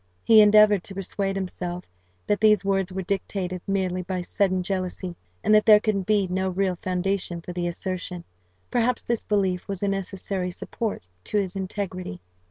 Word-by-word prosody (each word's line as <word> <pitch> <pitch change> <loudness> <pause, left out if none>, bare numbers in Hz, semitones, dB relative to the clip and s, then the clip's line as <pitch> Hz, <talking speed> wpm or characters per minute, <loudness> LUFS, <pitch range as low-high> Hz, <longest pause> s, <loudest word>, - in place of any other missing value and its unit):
He 220 -1 +8
endeavoured 210 -2 +6
to 195 - -9
persuade 195 0 -2
himself 180 -2 -4 0.4
that 205 -1 0
these 210 -3 +5
words 195 -1 +1
were 190 +1 -3
dictated 185 -1 -3
merely 185 -2 0
by 180 0 -3
sudden 185 0 0
jealousy, 185 -1 -3 0.3
and 215 - +3
that 215 0 +6
there 210 -1 +9
could 200 -3 -1
be 210 -2 +3
no 190 +1 -1
real 185 0 0
foundation 185 0 -1
for 175 +1 -8
the 175 0 -2
assertion: 180 0 -4 0.5
perhaps 240 +1 +1
this 235 -1 -1
belief 190 -4 0
was 195 -1 -4
a - - +2
necessary 195 -1 -2
support 200 - -5 0.2
to - - -1
his 195 -2 -1
integrity. 185 - -4
190 Hz, 170 wpm, -25 LUFS, 180-205 Hz, 0.5 s, there